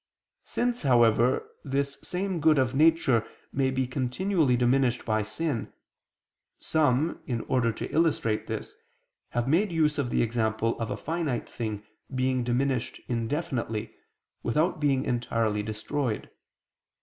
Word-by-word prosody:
Since, 245 0 -1
however, 120 -2 +4 0.2
this 140 0 -1
same 185 -1 -2
good 155 0 +4
of 130 -2 +2
nature 150 -6 +4 0.3
may 135 -1 +2
be 130 0 0
continually 135 +3 +1
diminished 125 0 +2
by 110 -1 +1
sin, 115 +4 -3 0.9
some, 155 0 +1
in 120 -4 -1
order 125 -2 +1
to - - -5
illustrate 150 -9 +1
this, - - -5 0.6
have 120 0 -1
made 175 +7 +3
use 155 -3 +2
of 130 -4 0
the - - +2
example 115 0 0
of 115 - -2
a - - -3
finite 160 -6 -2
thing 110 -3 -4 0.3
being 130 -1 +1
diminished 125 0 0
indefinitely, 115 -3 -2 0.5
without 155 +8 +1
being 140 -3 +2
entirely 115 -3 0
destroyed. 110 +3 -3
130 Hz, 125 wpm, -28 LUFS, 115-150 Hz, 0.9 s, however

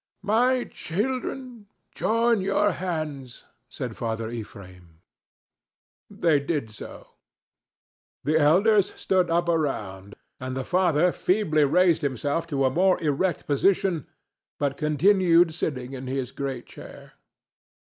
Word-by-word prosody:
"My 245 +5 +2
children, 245 +3 -4 0.3
join 230 -1 +1
your 205 +2 +2
hands," 155 -8 -5 0.3
said 125 -3 -6
Father 115 -1 -3
Ephraim. 90 -7 -10 1.1
They 160 -4 +2
did 140 -5 -3
so. 105 - -11 1.1
The 155 +2 +2
elders 195 +7 +3
stood 185 -2 +1
up 170 +1 +1
around, 105 - -2 0.2
and 130 0 -5
the 130 - -2
father 180 -2 +2
feebly 165 -7 +1
raised 175 +3 +3
himself 145 +4 -2
to 140 -4 0
a 130 - +2
more 185 +5 +3
erect 160 +3 -1
position, 175 +1 +1 0.5
but 140 -1 -1
continued 170 +2 +3
sitting 135 -5 -4
in 130 0 -7
his 130 -1 -3
great 135 -3 -5
chair. - - -13
155 Hz, 115 wpm, -25 LUFS, 130-185 Hz, 1.1 s, elders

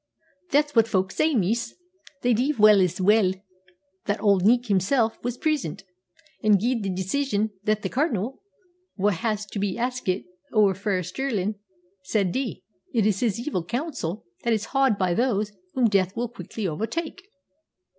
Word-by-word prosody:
"That's 295 -1 +2
what 225 -1 +5
folk 190 -3 0
say, 310 +6 +1
miss. 225 +3 0 0.5
They 245 0 +4
div 260 +7 +1
say 210 -2 +7
as 180 0 -1
weel 195 0 +4 0.7
that 205 0 -1
Auld 200 -2 +3
Nick 240 +4 +4
himsel' 220 +3 +2
was 245 0 -3
present, 225 - -1 0.6
an' 215 -1 +4
gied 235 +4 0
the 200 - -2
decision 205 +4 -1
that 215 +1 +1
the - - -1
Cardinal, 255 - -1 0.6
wha 205 +1 +2
was 215 -2 0
to 205 0 -6
be 195 -2 -1
askit 245 -6 -2 0.3
ower 205 -3 +5
frae 190 -1 -1
Stirlin', 215 -2 -2 0.5
should 195 -1 0
dee. 260 -1 -3 0.3
It 225 -5 +2
is 205 -3 +2
his 230 -4 0
evil 240 - -2
counsel 235 - -4 0.2
that 235 - +2
is 215 -1 -2
h'ard 270 -6 +3
by 185 -3 +1
those 215 -1 0 0.2
whom 250 -3 +4
death 195 -3 +1
will 240 0 -1
quickly 225 -3 -5
overtake." 305 - -3
215 Hz, 160 wpm, -25 LUFS, 195-245 Hz, 0.7 s, say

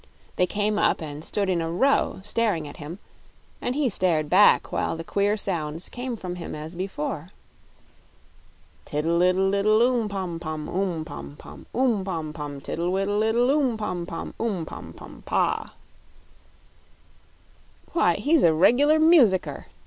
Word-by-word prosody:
They 180 - +2
came 210 +1 0
up - - +2
and 150 -1 -7
stood 200 +3 -1
in 180 -3 +1
a 165 0 -2
row, 265 +1 +1
staring 205 -7 0
at 145 - -10
him, 150 +5 -7 0.6
and 245 - -2
he 290 -2 +1
stared 170 -8 +1
back 200 +3 +5
while - - -1
the 165 - -6
queer 200 +4 0
sounds 165 -4 -3
came 250 0 -4
from 180 -4 -6
him 170 - -6
as 155 +2 -7
before: 175 -3 -4 1.5
Tiddle 165 +3 0
iddle 190 +2 +3
iddle, 215 +2 +3
oom 240 -2 +2
pom 185 -4 -4
pom, 155 -2 -5
Oom, 180 -4 -2
pom 145 -2 -9
pom; - - -13
oom 240 -6 +2
pom 165 -5 -4
pom! 145 -2 -6
Tiddle 170 +5 -3
widdle 195 +2 0
iddle, 235 +4 +2
oom 275 -6 +1
pom 180 -5 -3
pom, 165 - -6
Oom, 200 -8 -1
pom - - -9
pom - - -12
pah! - - 0 2.2
"Why, - - +3
he's 305 +1 +2
a 165 - +5
reg'lar 255 - +4
musicker!" 310 - +4
190 Hz, 155 wpm, -25 LUFS, 165-220 Hz, 2.2 s, back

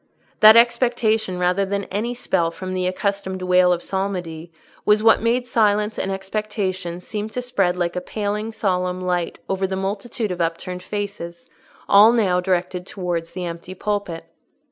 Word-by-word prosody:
That 215 +1 +9
expectation 235 -4 +2
rather 180 +2 +1
than 200 +1 -2
any 225 +5 -2
spell 170 -8 0
from 185 +2 -6
the 185 -1 0
accustomed 190 0 -2
wail 180 0 +4
of 175 -1 0
psalmody 175 -4 -4 0.3
was 210 0 +3
what 225 - +5
made 240 +2 +1
silence 210 -3 +1
and 195 - -2
expectation 195 -3 -3
seem 210 +3 -5
to 235 - -4
spread 200 -8 0
like 175 0 -1
a 180 - -2
paling 210 +3 -3
solemn 185 -3 -1
light 180 -2 -1
over 190 0 -1
the 190 - -3
multitude 200 +3 -3
of 180 -1 -3
upturned 170 +2 -3
faces, 180 -4 -6 0.4
all 210 +3 +7
now 195 -6 +2
directed 180 0 -1
towards 175 -3 -4
the 180 -1 -4
empty 170 +2 -7
pulpit. 200 -5 -3
190 Hz, 160 wpm, -22 LUFS, 180-210 Hz, 0.4 s, That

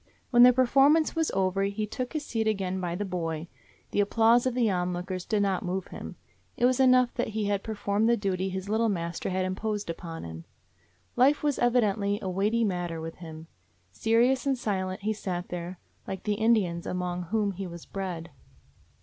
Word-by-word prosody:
When 240 -1 +6
the 250 +1 +10
performance 275 +6 +4
was 325 -1 +1
over 190 0 0
he 200 +2 -2
took 250 +4 -5
his 305 -2 -3
seat 225 -1 -1
again 190 -3 -1
by 175 -1 -2
the 205 +3 -3
boy. 165 -3 -3 0.4
The - - 0
applause 230 +4 +4
of 250 - -1
the 245 -3 +2
onlookers 180 -1 -2
did 210 -2 +1
not 195 -2 0
move 185 +1 -3
him. - - -8 0.4
It 240 - +3
was 255 0 +3
enough 255 -1 +5
that - - -1
he 215 - 0
had 200 -1 0
performed 210 0 0
the 235 - +4
duty 190 -2 -1
his 190 +1 -5
little 220 +2 +1
mas 170 -4 -3
ter - - -3
had 185 0 0
imposed 205 0 -2
upon 165 -1 -7
him. 80 0 -8 0.7
Life 275 +5 +4
was 295 -2 +1
evi 245 0 +4
dently 205 0 0
a 190 - -4
weighty 210 +5 +1
matter 175 -5 -2
with 165 0 -7
him. 160 -2 -9 0.5
Serious 240 +5 +2
and 270 -1 +2
silent 190 -5 -2
he 215 +2 0
sat 180 -4 -4
there, 175 +1 -5 0.3
like 190 -1 -5
the 210 - 0
Indians 205 -6 +1
among 180 -1 -3
whom 205 +2 0
he 195 0 -6
was 170 -1 -9
bred. 175 -4 -5
200 Hz, 195 wpm, -28 LUFS, 180-230 Hz, 0.7 s, the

